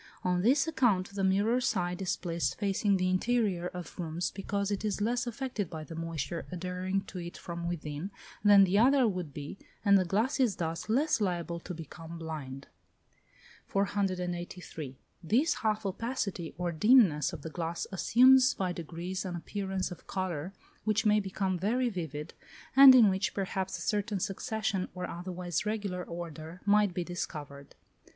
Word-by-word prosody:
On 180 -1 +1
this 275 - +3
account 220 -12 +2
the 200 -1 -2
mirror 205 +6 +2
side 180 -7 -1
is 185 - -1
placed 170 -6 -2
facing 200 -1 +1
the 185 0 +1
interior 185 -2 +1
of 180 0 -8
rooms, 170 +1 -2
because 200 +1 -2
it 200 0 -2
is 210 -2 -1
less 240 +3 0
affected 240 - -3
by 160 -1 -6
the 165 - -9
moisture 165 0 -4
adhering 185 +2 -2
to 190 - -8
it 175 0 -7
from 170 0 -5
within, 155 0 -4 0.3
than 205 -1 +8
the 195 +2 +3
other 260 +1 +5
would 180 -7 -3
be, 145 +6 -7 0.3
and 200 -1 +6
the - - +2
glass 215 - 0
is 240 -7 +3
thus 165 +3 -4
less 275 +2 +2
liable 175 -3 -1
to 180 +1 -7
become 165 +1 -9
"blind." 145 -5 -6 1.0
483. 180 -7 -2 0.3
This 255 - +3
half 215 -1 0
opacity 195 -4 -3
or 175 -1 -1
dimness 185 - +5
of - - -8
the 160 - -6
glass 170 +1 -3
assumes 255 +6 +5
by 185 -2 -1
degrees 175 +2 -5
an 185 -2 -4
appearance 190 +1 -3
of 180 - -10
colour 185 -3 -3 0.3
which 215 +1 +1
may 210 0 +5
become 190 -2 -2
very 240 +7 +1
vivid, 160 - -5 0.4
and 270 -1 +11
in 235 -4 +8
which 190 0 0
perhaps 190 -1 -2
a - - -8
certain 205 -1 -1
succession, 195 0 -2
or 180 0 -3
otherwise 175 -1 -3
regular 205 -4 -2
order, 170 0 -7
might 205 -1 +4
be 175 0 -2
discovered. 145 -5 -6
185 Hz, 160 wpm, -30 LUFS, 170-210 Hz, 1.0 s, and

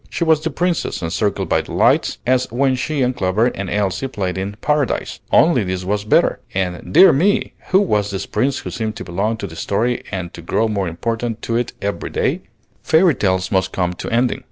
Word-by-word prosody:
She - - -2
was 160 -2 +3
the 160 - -1
Princess, 175 - -1
encircled 100 +6 -1
by - - +2
delights, - - +1
as 130 -1 +1
when 130 +2 +2
she 140 +2 -1
and 125 0 0
Clover 100 +1 +1
and 100 -1 -5
Elsie 105 +5 -1
played 95 -7 -3
in 95 +2 -4
"Paradise," 150 -2 -1
only, 150 -9 +4
this 90 -1 -3
was 105 +2 -1
better; - - +3 0.2
and, 90 -2 -2
dear 190 - +8
me! 185 +9 +1 0.2
who 190 - +5
was 105 - +1
this 95 -2 -4
Prince 135 +1 0
who - - -6
seemed 110 -2 -3
to - - -6
belong 100 +6 -2
to 105 - -5
the 80 -4 -9
story 115 +8 -1
and 90 -3 -4
to 85 - -9
grow 110 +7 0
more 100 -4 -1
important 115 +7 -3
to 115 - -2
it 120 0 -1
every 100 -4 -3
day? - - -1 0.4
Fairy 165 +1 +4
tales 95 -5 0
must 95 -1 +1
come 90 -1 0
to - - -6
ending. 120 +2 +1
110 Hz, 205 wpm, -19 LUFS, 95-130 Hz, 0.4 s, dear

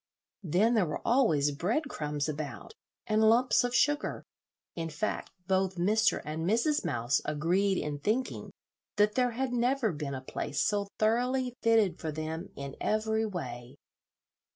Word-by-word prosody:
Then 195 +6 +2
there 210 -7 +3
were 150 - -3
always 160 - +3
bread 195 - 0
crumbs 150 - -3
about, 155 - -5 0.3
and 215 -1 +2
lumps 245 +3 +4
of 245 0 -1
sugar; 295 0 +1 0.5
in 165 -1 -3
fact, 160 +8 -3 0.2
both 190 0 +1
Mr. 210 +5 +2
and 155 +2 -4
Mrs. 235 - +2
Mouse 120 +3 0
agreed 180 +6 +1
in 145 -1 -3
thinking 225 - -1 0.5
that 210 0 +3
there 250 +1 +2
had 255 +1 -2
never 245 -1 +1
been 145 -3 -4
a 130 - -5
place 135 +1 -4
so 205 -1 0
thoroughly 250 +3 +1
fitted 220 -7 +3
for 160 - -3
them 160 +4 -5
in 140 -1 -7
every 220 +1 0
way. 125 - -6
195 Hz, 150 wpm, -30 LUFS, 150-230 Hz, 0.5 s, lumps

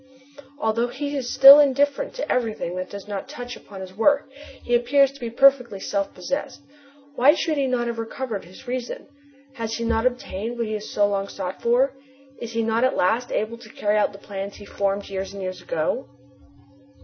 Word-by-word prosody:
Although 230 -2 0
he 285 +3 -4
is 255 -3 -3
still 275 +2 +10
indifferent 285 - +2
to - - -3
everything 220 -7 -1
that 185 0 -4
does 200 0 -9
not 205 +5 -5
touch 245 -4 -7
upon 195 -2 -11
his 185 0 -9
work 280 +7 +3 0.4
he 240 - -2
appears 265 +3 +4
to 280 - -15
be 235 -2 -4
perfectly 250 -4 +4
self 200 0 -2
possessed. 230 +11 -4 0.5
Why 285 +3 +5
should 320 -2 -1
he 280 -2 +1
not 250 -2 0
have 235 -1 -3
recovered 225 -2 -4
his 185 +10 -15
reason? 250 0 -4 0.5
Has 225 -3 -4
he 235 - -3
not 230 +1 +2
obtained 240 -3 -4
what 235 - -1
he 215 - -4
has 215 0 -5
so 205 -1 +2
long 200 -1 -1
sought 190 -2 -6
for? 255 +3 +3 0.5
Is 235 -1 -6
he 230 0 0
not 225 +2 +1
at 260 - +2
last 230 +7 +1
able 225 +2 -2
to 225 -2 -13
carry 210 -1 -1
out 210 -1 +2
the 200 - -11
plans 200 0 -6
he 205 - -12
formed 200 0 -2
years 195 0 -5
and 200 - -7
years 185 0 -5
ago? - - -2
235 Hz, 200 wpm, -23 LUFS, 205-265 Hz, 0.5 s, still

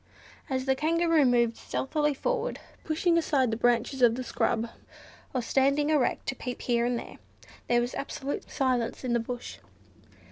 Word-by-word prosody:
As 260 -1 -1
the 265 - +3
Kangaroo 325 +1 +2
moved 235 -2 +3
stealthily 295 +1 -1
forward, - - -1 0.2
pushing 335 +2 +2
aside 270 -7 +1
the - - 0
branches 245 +3 +1
of 235 -2 +6
the 255 - -4
scrub, 230 -1 0 0.6
or 255 -2 -1
standing 280 +5 +2
erect 295 -5 +1
to 270 - -2
peep 250 0 -6
here 240 -1 +2
and 245 -1 0
there, - - -9 0.5
there 240 0 +3
was 240 +1 -3
absolute 280 0 -4
silence 255 -5 0
in 250 -2 -1
the 235 - +3
bush. 240 +1 -6
260 Hz, 165 wpm, -28 LUFS, 240-295 Hz, 0.6 s, of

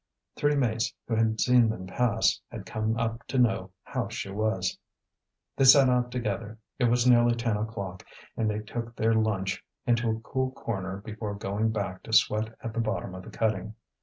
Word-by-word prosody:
Three 145 0 +2
mates 115 -5 0
who 115 - 0
had 110 0 +1
seen 125 -2 +5
them 100 -4 -4
pass 110 +3 +1
had 110 -5 -8
come 110 +3 -1
up 115 0 -1
to 135 - -2
know 115 -6 +2
how - - -3
she 95 - -5
was. 100 -3 -1 0.8
They - - +2
set 135 0 +8
out 125 -1 +2
together. 110 -2 -3 0.2
It 125 - +3
was 120 +1 +3
nearly 120 -1 +5
ten 115 -2 0
o'clock, 100 -4 -4 0.3
and 110 -1 0
they 105 0 -2
took 115 +2 -6
their 115 -1 +2
lunch 105 -4 0 0.2
into 120 -1 +2
a 110 0 -1
cool 130 +3 -2
corner 95 -6 -4
before 105 -1 -5
going 105 +2 -1
back 100 -4 -3
to 110 - -8
sweat 110 +1 +3
at 115 - -5
the 115 - -2
bottom 110 -4 -2
of 95 - -7
the - - -11
cutting. 105 -1 -1
110 Hz, 190 wpm, -28 LUFS, 105-120 Hz, 0.8 s, set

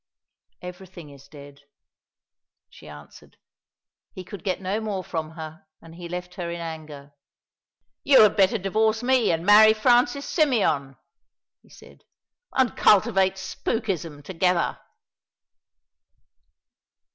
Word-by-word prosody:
"Everything 180 -3 -11
is 140 0 -16
dead," 140 -1 -14 1.1
she - - -16
answered. 75 -1 -15 0.8
He 185 - -9
could 190 -1 -11
get 185 -2 -2
no 195 +3 -3
more 205 -4 -4
from 160 -3 -5
her, 160 +1 -10
and 165 0 -15
he 170 0 -10
left 180 0 -7
her 175 -2 -6
in 170 0 -6
anger. 155 -4 -9 0.9
"You 275 -5 +6
had 210 - +3
better 195 +3 +3
divorce 220 +3 0
me 250 -5 +2
and 165 +1 -2
marry 215 +2 +7
Francis 245 +5 +2
Symeon," 200 - 0 0.6
he - - -26
said, - - -18 0.5
"and 260 -3 +1
cultivate 190 -1 +3
spookism 190 - -4
together." 180 +1 -1
180 Hz, 115 wpm, -24 LUFS, 160-215 Hz, 1.1 s, marry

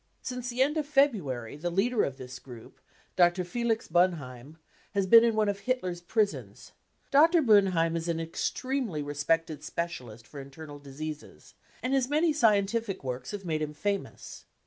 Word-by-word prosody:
Since 250 -1 -4
the 250 +2 +2
end 295 +3 -1
of 300 -2 -1
February 190 - +1
the 175 +4 -3
leader 210 +6 +1
of 135 -1 -3
this 130 0 -9
group, 120 -4 -13 0.4
Dr. 175 0 +3
Felix 225 +4 -1
Boenheim, 155 -5 -1 0.4
has 200 -1 +2
been 230 +4 +8
in 230 -2 +2
one 215 -1 +2
of 200 -1 -1
Hitler's 190 -7 -2
prisons. 205 +3 -2 0.4
Dr. 325 +5 +6
Boenheim 190 -7 +4
is 165 0 -3
an 165 -1 -1
extremely 190 - -2
respected 150 +1 -1
specialist 125 -10 -5
for 145 - -10
internal 145 +2 -10
diseases, 150 +2 -9 0.3
and 255 +2 -1
his 265 -2 +1
many 310 +2 +2
scientific 220 - +1
works 125 -1 -5
have 205 -2 -6
made 155 -2 -1
him 150 0 -4
famous. 200 +4 -4
180 Hz, 160 wpm, -28 LUFS, 150-230 Hz, 0.4 s, been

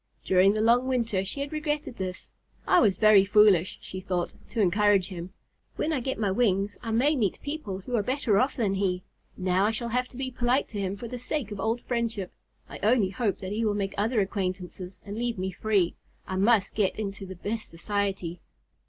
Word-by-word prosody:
During 190 +2 +5
the 215 - 0
long 240 +3 +4
winter 230 -7 0
she 200 +9 -5
had 280 +2 -4
regretted 300 -4 -2
this. 185 -1 -5 0.3
"I - - +5
was 195 -5 +3
very 215 -3 +7
foolish," 200 -3 +4
she 185 - -6
thought, 180 -2 -2 0.2
"to 230 - -4
encourage 200 -1 +3
him. 180 -1 -7 0.4
When 315 - -1
I 285 - +1
get 265 +2 -3
my 205 -3 0
wings 200 -2 +1
I 230 - -5
may 260 +7 +3
meet 210 -9 0
people 285 -11 -4
who 245 +6 -3
are 225 - +3
better 245 -3 +1
off 260 +5 +1
than 210 -6 0
he. 185 -2 0 0.3
Now 185 +2 +2
I - - +2
shall 230 +1 -3
have 250 +2 0
to 250 - -14
be 260 -1 -3
polite 245 +2 +1
to 210 - -5
him 195 0 -2
for 235 - -6
the 250 +2 -6
sake 250 -3 -3
of 205 - -5
old 225 +3 0
friendship. 230 -6 -2 0.3
I - - -9
only 215 -2 +3
hope 205 0 -1
that 190 0 -5
he 220 +2 -1
will 210 -2 +1
make 195 -1 -2
other 215 +2 +1
acquaintances 185 -1 -4
and 205 +2 -5
leave 240 -2 -1
me 190 +1 -2
free. 195 -2 +1 0.3
I 190 - -4
must 200 +1 +3
get 200 -3 +1
into 195 -2 -5
the 190 - -7
best 215 +5 -4
society." 190 -1 -2
205 Hz, 215 wpm, -27 LUFS, 190-235 Hz, 0.4 s, very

